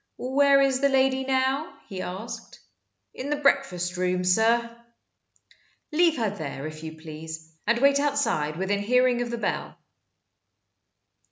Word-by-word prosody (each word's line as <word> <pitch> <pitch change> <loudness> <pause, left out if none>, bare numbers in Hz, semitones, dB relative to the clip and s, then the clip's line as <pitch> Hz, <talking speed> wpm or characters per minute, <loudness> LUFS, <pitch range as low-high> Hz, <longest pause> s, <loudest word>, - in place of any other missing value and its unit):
"Where 275 +2 +4
is 270 -1 +2
the 280 +1 +3
lady 265 0 +2
now?" 265 +5 0
he 190 -2 -6
asked. 190 +6 -7 0.5
"In 270 - -6
the 295 - +1
breakfast 190 -12 +1
room, 180 0 0
sir." 230 +5 +2 1.2
"Leave 330 0 +3
her 220 -4 0
there, 150 -7 -6
if 155 0 -7
you 160 0 -7
please, 160 0 -9
and 235 +1 +3
wait 280 +2 +4
outside 280 - 0
within 195 +2 0
hearing 250 +3 +3
of 240 - -2
the 235 - -3
bell." - - -3
235 Hz, 140 wpm, -26 LUFS, 180-270 Hz, 1.2 s, Where